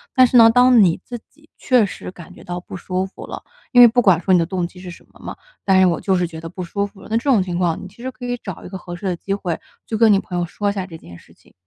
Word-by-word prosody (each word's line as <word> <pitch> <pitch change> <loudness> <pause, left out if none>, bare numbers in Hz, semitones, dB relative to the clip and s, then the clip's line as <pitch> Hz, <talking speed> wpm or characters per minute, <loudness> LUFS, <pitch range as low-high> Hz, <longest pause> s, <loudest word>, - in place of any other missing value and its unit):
但 255 -1 +7
是 250 - -2
呢， 230 -1 +8
当 245 -1 +5
你 175 -2 +2
自 240 -1 -7
己 305 +2 -26
确 250 -4 +3
实 195 - -8
感 175 -3 -13
觉 - - -15
到 175 0 -5
不 180 - -11
舒 185 +1 -3
服 190 - -11
了， - - -8 0.3
因 245 - +5
为 240 - +11
不 245 +2 +2
管 190 -7 +4
说 185 +2 +1
你 180 - +5
的 165 - +1
动 180 -2 -2
机 180 - -16
是 180 0 -9
什 175 - -13
么 - - -20
嘛， - - -8 0.3
但 190 -1 +3
是 190 - +6
我 170 -3 0
就 190 - +1
是 180 - 0
觉 165 -1 -8
得 165 - -7
不 180 +1 -7
舒 200 +4 -3
服 200 -1 -19
了， - - -12
那 - - +1
这 - - -3
种 235 -7 +4
情 175 -2 -4
况， 175 -3 0
你 190 - -8
其 210 - -17
实 255 - -4
可 250 - -10
以 245 0 -2
找 190 -5 -7
一 - - -8
个 190 0 -7
合 175 0 -8
适 185 +3 -10
的 180 - 0
机 195 +3 -8
会 180 -4 -2 0.3
去 225 - -4
跟 220 -1 +5
你 195 - +5
朋 180 -2 -6
友 175 - 0
说 200 +4 -2
一 - - -6
下 190 -2 -4
这 165 - -10
件 85 - -14
事 - - -21
情。 - - -26
190 Hz, 360 characters per minute, -20 LUFS, 175-225 Hz, 0.3 s, 为